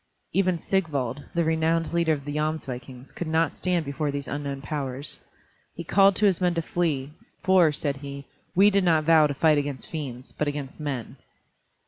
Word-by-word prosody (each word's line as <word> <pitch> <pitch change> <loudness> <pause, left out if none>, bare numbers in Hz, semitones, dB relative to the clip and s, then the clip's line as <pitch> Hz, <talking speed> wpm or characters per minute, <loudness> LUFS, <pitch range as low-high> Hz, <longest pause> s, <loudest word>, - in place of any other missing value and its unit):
Even 185 -2 +2
Sigvald, 145 -8 -1
the 170 - +3
renowned 160 +1 +1
leader 170 -1 +2
of 140 -2 -5
the 145 - -4
Jomsvikings, 135 -4 -4
could 175 - -4
not 160 +1 +2
stand 180 -3 0
before 145 +2 -2
these 140 0 -4
unknown 140 -1 -4
powers. 140 -1 -4 0.6
He 170 - -5
called 195 +3 +5
to 210 - +2
his 190 -3 +3
men 175 -1 +2
to 165 - +1
flee, 150 -6 -1 0.3
for, 185 -4 +5
said 145 -1 -2
he, 140 0 -8 0.3
"we 200 +3 +6
did 200 -1 +3
not 165 -3 +3
vow 160 -1 +6
to 145 - -4
fight 155 0 +4
against 140 -2 -4
fiends, 130 -6 -6
but 150 - -2
against 145 -1 -5
men." 135 -6 -4
155 Hz, 180 wpm, -26 LUFS, 140-170 Hz, 0.6 s, we